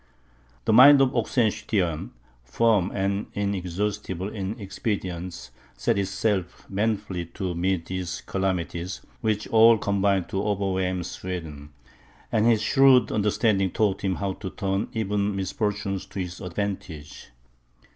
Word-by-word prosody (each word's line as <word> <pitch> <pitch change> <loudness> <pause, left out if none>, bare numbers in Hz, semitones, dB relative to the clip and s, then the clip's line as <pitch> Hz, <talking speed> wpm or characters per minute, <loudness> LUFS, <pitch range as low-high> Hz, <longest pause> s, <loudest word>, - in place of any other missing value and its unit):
The - - +3
mind 140 +5 +9
of 135 -2 +4
Oxenstiern, 100 - 0 0.3
firm, 100 - +2
and 100 +1 -1
inexhaustible 100 -1 -2
in 105 0 -5
expedients, 90 - -4 0.3
set 65 +10 +1
itself 95 -2 -2
manfully 100 -4 -2
to 95 -3 -2
meet 90 0 -1
these 90 -2 -4
calamities, 90 -1 -3 0.2
which 110 -1 -1
all 115 0 +7
combined 100 -3 +1
to 95 - -1
overwhelm 95 -3 -1
Sweden; 80 -5 -6 0.6
and 110 +1 +3
his 110 -2 +3
shrewd 130 -3 +5
understanding 105 -2 +2
taught 100 0 0
him 95 -2 0
how 100 -1 -2
to 95 0 -6
turn 95 +1 -2
even 105 -2 -1
misfortunes 100 0 -2
to - - -7
his 90 -1 -5
advantage. 90 -5 -5
95 Hz, 120 wpm, -25 LUFS, 90-105 Hz, 0.6 s, mind